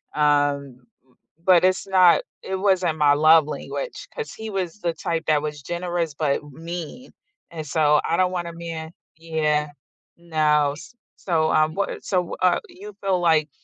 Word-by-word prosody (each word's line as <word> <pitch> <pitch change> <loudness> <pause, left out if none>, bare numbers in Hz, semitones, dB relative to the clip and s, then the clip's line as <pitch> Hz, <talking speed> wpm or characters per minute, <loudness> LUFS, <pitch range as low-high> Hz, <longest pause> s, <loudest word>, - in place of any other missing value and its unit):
um 145 -3 +1 0.7
but 180 -2 +5
it's 185 +1 +1
not 185 -3 +5 0.2
it 190 - -3
wasn't 185 -4 +1
my 145 -2 +4
love 155 +1 +6
language - - -6
'cause 460 -2 -5
he 220 0 -7
was 190 0 -3
the 170 -1 -1
type 165 0 -3
that 155 -2 +3
was 150 -1 -5
generous 175 0 -3
but 145 -1 -1
mean, 170 - -8 0.4
and 160 -2 -6
so, 150 -1 +3
I 165 - +1
don't 185 0 +2
wanna 175 -2 -4
man 165 -1 -7 0.3
yeah, 155 -2 0 0.5
no, 150 -4 +1
s 165 +10 -12 0.2
so, 160 -3 0
um, 155 0 +2
what 200 - -3
so, 185 - -1
w 180 - -4
uh, 185 -1 +3
you 395 +4 -11
feel 190 -2 +1
like 160 -3 +2
165 Hz, 165 wpm, -23 LUFS, 150-180 Hz, 0.7 s, love